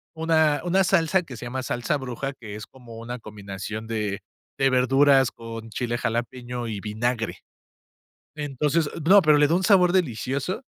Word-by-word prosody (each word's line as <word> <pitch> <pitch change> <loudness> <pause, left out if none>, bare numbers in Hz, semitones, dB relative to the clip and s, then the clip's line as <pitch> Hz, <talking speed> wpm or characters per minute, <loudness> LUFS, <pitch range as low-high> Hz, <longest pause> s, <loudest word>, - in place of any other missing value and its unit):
una 160 -2 +2
una 190 +2 +3
salsa, 180 0 +2
que 135 -7 -10
se 120 - -8
llama 130 +2 -4
Salsa 120 +3 -1
bruja, 135 +1 -5
que 105 -3 -8
es, 105 - -7
como 120 -4 -13
una 120 +2 -6
combinación 105 0 -7
de 105 -3 -3 0.4
de 135 - +3
verduras, 135 +1 +4
con 115 -1 -9
chile 120 +2 -2
jalapeño 120 +1 -3
y 105 -3 -4
vinagre. 115 +2 -2 1.0
Entonces 150 +2 0 0.2
No, 200 +3 +7
pero 155 -2 +5
le 145 0 +4
da 165 - +2
un 185 - 0
sabor 180 -4 +5
delicioso. 140 - -1
125 Hz, 160 wpm, -24 LUFS, 115-155 Hz, 1.0 s, No